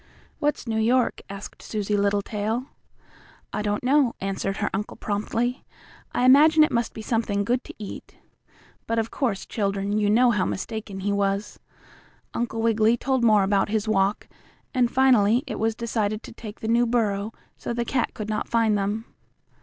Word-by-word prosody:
"What's 295 0 0
New 220 -2 -1
York?" 240 +3 +2
asked 200 0 -9
Susie 210 -1 -2
Littletail. 205 +3 0 0.9
"I - - -1
don't 205 +1 -1
know," 265 -1 +3
answered 195 0 -2
her - - -1
uncle 205 +2 -4
promptly. 225 +4 -2 0.5
"I 250 - +1
imagine 305 +4 +7
it 305 - +2
must 235 -1 -1
be 220 - -6
something 215 -3 0
good 245 +4 0
to - - -10
eat." 210 -2 -9 0.7
But 230 - -1
of 225 0 -1
course, 230 -8 -1
children, 200 0 -1
you 205 -1 +2
know 240 +3 +5
how 210 -5 +1
mistaken 205 -1 -4
he 200 +1 0
was. 200 0 -1 0.7
Uncle 230 -1 -2
Wiggily 225 0 +3
told 260 0 0
more 215 -3 +5
about 195 +1 +2
his 215 0 -1
walk, 200 -1 +1 0.5
and 250 -3 +2
finally 245 -2 +4
it 270 - -5
was 225 0 +1
decided 220 -2 -2
to - - -10
take 220 -2 -10
the 220 - -3
new 235 +1 +3
burrow, 215 -3 0 0.2
so - - -5
the 235 0 -1
cat 250 0 -1
could 215 - -5
not 215 -1 -2
find 225 -2 +3
them. 205 +3 -1
220 Hz, 170 wpm, -25 LUFS, 205-240 Hz, 0.9 s, imagine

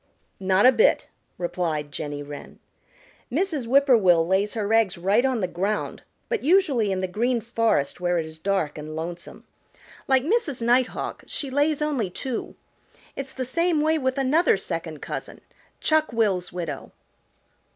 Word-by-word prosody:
"Not 190 +2 +3
a 255 - +9
bit," 450 - +3 0.3
replied 170 -4 -2
Jenny 145 0 -5
Wren. 145 0 -10 0.7
"Mrs. 305 -4 -1
Whip 275 +3 +5
poor 260 -3 +6
will 175 -6 +4
lays 195 +5 +1
her 215 -1 -1
eggs 220 -5 +3
right 195 +7 +2
on 260 -4 +1
the 185 - 0
ground, 195 +5 -2 0.3
but 460 - -1
usually 280 - +3
in 190 -1 -1
the 185 - -1
Green 235 +6 0
Forest 225 - 0
where 175 0 +1
it 165 - -1
is 160 0 -10
dark 175 -6 -1
and 155 +1 -7
lonesome. 170 +2 -7 0.6
Like 265 -1 +3
Mrs. 325 - 0
Nighthawk, 245 +2 0
she 275 -3 -4
lays 290 +2 +1
only 270 -10 -1
two. 245 +6 -5 0.6
It's 275 -1 -6
the 260 - -4
same 335 +5 +1
way 315 +1 +2
with 260 0 -1
another 280 +6 +3
second - - -5
cousin, - - -6 0.4
Chuck 310 -1 +2
will's 205 -6 0
widow." 165 -6 -5
225 Hz, 160 wpm, -24 LUFS, 180-275 Hz, 0.7 s, a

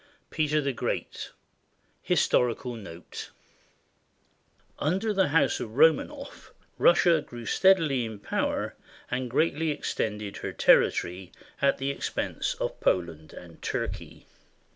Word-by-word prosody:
Ill 285 - -30 0.2
PETER 150 -1 +1
THE 140 -1 -1
GREAT - - -3 0.7
HISTORICAL 125 0 +1
NOTE 90 -6 -9 1.5
Under 190 +8 0
the 190 -2 +3
House 150 +1 +2
of 110 -1 -6
Romanoff, 160 +2 +1 0.3
Russia 170 -2 +5
grew 120 -4 -10
steadily 165 -9 +3
in 110 -2 -6
power 100 - -2 0.4
and 125 0 -2
greatly 160 +4 +1
extended 105 -8 -3
her - - -5
territory 90 +1 +3 0.3
at 140 0 +3
the 135 +1 -1
expense - - -2
of - - -4
Poland 80 -3 -1
and 85 -2 -13
Turkey. - - -4
135 Hz, 115 wpm, -27 LUFS, 105-160 Hz, 1.5 s, Russia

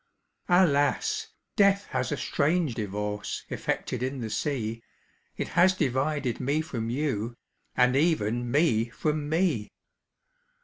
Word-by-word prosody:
"Alas! 185 - +3 0.3
death 200 0 +4
has 130 -1 -1
a 145 - -1
strange 150 +3 +1
divorce 105 -1 -4
Effected 125 - -2
in 130 +1 -2
the 110 -3 -4
sea, 115 -3 -2 0.6
It - - -3
has 185 +1 +4
divided 140 -3 0
me 140 +4 +1
from 115 -8 -4
you, 120 -4 -1 0.4
And 125 0 +4
even 120 -6 +1
me 120 -5 +2
from 150 +4 -2
me! 160 - +1
135 Hz, 120 wpm, -27 LUFS, 115-155 Hz, 0.6 s, death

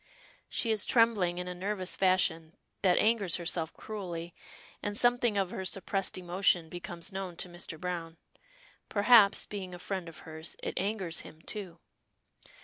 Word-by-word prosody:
She 230 - 0
is 215 -2 +1
trembling 215 -7 +3
in 180 0 -3
a 180 - -3
nervous 185 +1 -2
fashion, 170 -4 +2 0.3
that 185 -2 +4
angers 215 -5 +3
herself 165 -2 -1
cruelly, 175 -5 -6 0.5
and 205 0 -2
something 240 -3 +3
of 195 -2 +1
her 190 - -4
suppressed 195 +1 -1
emotion 175 -2 +2
becomes 175 0 -5
known 190 -2 -4
to 180 - -3
Mr. 175 -2 -6
Browne. 170 -2 -4 0.7
Perhaps, 210 -1 +6
being 190 -3 -6
a - - -8
friend 180 -1 -4
of 165 - -12
hers, 160 +1 -5
it - - -2
angers 190 -4 -1
him, 155 - -11
too. 190 -5 -6
185 Hz, 150 wpm, -31 LUFS, 175-205 Hz, 0.7 s, Perhaps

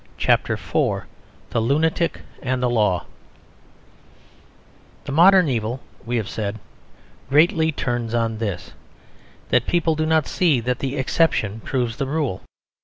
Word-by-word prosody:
CHAPTER - - +2
IV - - -1 0.5
THE - - +1
LUNATIC 160 +7 +1 0.2
AND 130 -1 -1
THE 125 - +2
LAW 105 -6 +1 2.0
The - - -5
modern 180 +4 +6
evil, 120 -1 -2 0.3
we 120 0 0
have 110 -3 -2
said, 110 -1 -4 0.7
greatly 160 +2 +4
turns 120 -5 -2
on 115 -2 -1
this: 105 -6 -4 0.8
that 125 -1 +2
people 170 -2 +2
do 155 0 -1
not 160 -2 +3
see 160 -8 +2
that 125 +1 -2
the 135 +1 -3
exception 130 -6 +1
proves 120 -1 -2
the 135 - -2
rule. 140 -10 -2
130 Hz, 130 wpm, -22 LUFS, 115-155 Hz, 2.0 s, modern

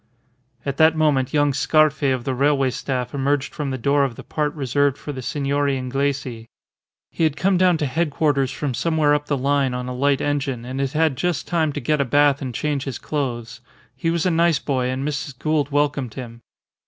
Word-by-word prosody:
At 140 -1 -3
that 160 0 +5
moment 145 -5 +2
young 145 -1 +2
Scarfe 155 +1 +2
of 130 -2 -1
the 135 - -2
railway 135 0 +2
staff 125 -1 -3
emerged 140 0 0
from 150 -3 -3
the 130 - -2
door 140 +3 +2
of 130 -4 -1
the - - -10
part 150 -1 -1
reserved 140 0 +1
for 150 - -6
the 130 -2 -6
Signori 140 +1 0
Inglesi. 130 -3 -2 0.6
He - - -2
had 155 -2 +1
come 190 +3 +2
down 180 -1 +4
to 150 - -1
headquarters 145 -2 +1
from 140 -1 -3
somewhere 155 +1 +2
up 145 0 -1
the 145 - 0
line 135 -1 +1
on 125 0 -4
a 125 - -4
light 140 +2 +1
engine, 140 -4 -2
and 130 +2 -5
had 135 -1 -2
had 155 -4 +1
just 175 +1 -1
time 160 -3 +1
to 145 - -3
get 150 +3 +1
a - - +1
bath 145 +2 +3
and 130 -2 -3
change 145 -1 -1
his 135 -3 -4
clothes. 120 -6 -4 0.3
He 165 - -1
was 170 0 0
a 185 - +3
nice 165 -1 +3
boy, 130 -3 -1
and 130 +2 -2
Mrs. 145 -3 -4
Gould 155 0 0
welcomed 145 -5 0
him. 120 -3 -8
140 Hz, 210 wpm, -22 LUFS, 130-150 Hz, 0.6 s, that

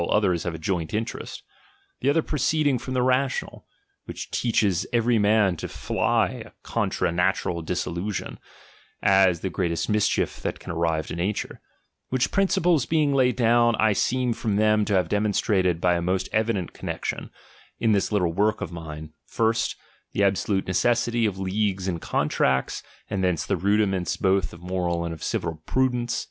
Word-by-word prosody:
others 95 -6 +2
have 85 -2 -3
a - - -8
joint 85 +1 -2
in 110 +1 0
terest; - - -8 0.6
the - - +1
other 160 +2 +2
proceeding 145 -2 +1
from 130 +2 -5
the 125 - +2
rational, 130 +1 0 0.4
which - - -7
teaches 105 -7 +1
every 120 -1 +2
man 105 -2 +3
to - - -5
fly - - 0
a - - -15
contra - - -1
natural 90 -1 0
dissolution, 85 +5 -3 0.6
as 95 -3 +4
the 95 - -2
greatest 85 0 -1
mischief 105 -1 +1
that - - -3
can - - -8
arrive 80 -1 0
;to - - -6
nature: 95 +5 -3 0.5
which 130 -1 0
principles 175 -7 +2
being 155 -3 +2
laid 125 -3 +3
down, 120 -1 +4
I 110 -1 +3 0.2
"«eem 125 -2 0
from 105 -3 -1
them 105 0 +3
to 100 - 0
have 90 -3 +2
demonstrated 100 -3 +1
by 90 0 +3
a 85 - 0
most 95 +2 0
evident 110 -5 0
connexion, - - -4 0.5
in 115 - +2
this 100 0 +1
little 90 -5 +1
work 105 +4 +1
of - - -5
mine, 80 -2 -8
first, 115 0 0 0.4
the 100 - +1
absolute 100 0 +1
necessity 120 +3 +1
of 100 -3 -4
leagues 95 0 -1
and 85 -3 -2
con - - 0
tracts, 65 -1 0 0.3
and 95 -2 -2
thence 90 -3 0
the - - 0
rudiments 95 -2 +1
both 95 -3 +1
of 85 - -13
moral 90 -2 -1
and 85 - -3
of 80 - -10
civil 80 -1 -3
prudence. 125 -2 0
100 Hz, 170 wpm, -25 LUFS, 90-115 Hz, 0.6 s, as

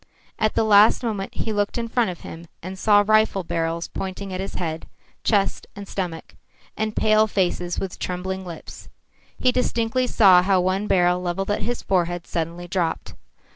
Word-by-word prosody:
At 215 0 +1
the - - +3
last 215 +2 +5
moment 210 -4 -3
he 220 - -2
looked 205 +2 -1
in 230 -1 -2
front 230 -2 +1
of 175 - -7
him 165 +1 -10 0.2
and 185 +2 -7
saw 205 0 +5
rifle 215 -2 +3
barrels 165 0 -2
pointing 190 0 -6
at 185 - -4
his 195 - -5
head, 160 -2 -4 0.4
chest 200 -3 +1
and 200 0 -8
stomach, 175 -5 -5 0.4
and 215 0 -2
pale 215 0 +4
faces 180 -3 -1
with 190 -2 -4
trembling 190 +1 -4
lips. 170 -3 -10 0.5
He 255 - +3
distinctly 250 0 0
saw 190 -7 +6
how 190 0 +2
one 185 +3 0
barrel 180 -2 +3
levelled 185 +3 -2
at 205 - -1
his 240 0 -3
forehead 175 -2 0
suddenly 170 +1 -4
dropped. 175 -2 -2
190 Hz, 175 wpm, -23 LUFS, 175-215 Hz, 0.5 s, saw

